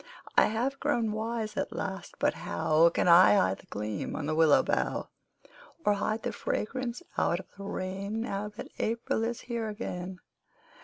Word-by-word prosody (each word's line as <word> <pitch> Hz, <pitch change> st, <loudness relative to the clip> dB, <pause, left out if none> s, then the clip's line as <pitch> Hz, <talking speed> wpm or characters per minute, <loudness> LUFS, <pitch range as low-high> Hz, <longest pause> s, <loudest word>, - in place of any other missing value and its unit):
I -, -, +7 dB
have 250 Hz, +6 st, -1 dB
grown 225 Hz, -2 st, +1 dB
wise 220 Hz, 0 st, -3 dB
at -, -, -2 dB
last -, -, -5 dB
but -, -, +2 dB
how 155 Hz, -, +3 dB
Can -, -, 0 dB
I 175 Hz, +4 st, +8 dB
hide 95 Hz, -, +2 dB
the -, -, -18 dB
gleam 105 Hz, -1 st, -4 dB
on 145 Hz, -, -3 dB
the 155 Hz, -, 0 dB
willow 160 Hz, -2 st, +5 dB
bough, -, -, -1 dB, 0.8 s
Or 205 Hz, -, +4 dB
keep 215 Hz, +2 st, -1 dB
the 245 Hz, -, -1 dB
fragrance 245 Hz, +3 st, -3 dB, 0.2 s
out 175 Hz, -, +2 dB
of 190 Hz, -, -9 dB
the 200 Hz, 0 st, -8 dB
rain 195 Hz, +3 st, -3 dB
Now 210 Hz, -3 st, -2 dB
that 210 Hz, -, -9 dB
April 225 Hz, 0 st, 0 dB
is 235 Hz, +1 st, -2 dB
here 230 Hz, -2 st, -3 dB
again? 185 Hz, -4 st, -5 dB
210 Hz, 170 wpm, -29 LUFS, 175-225 Hz, 0.8 s, I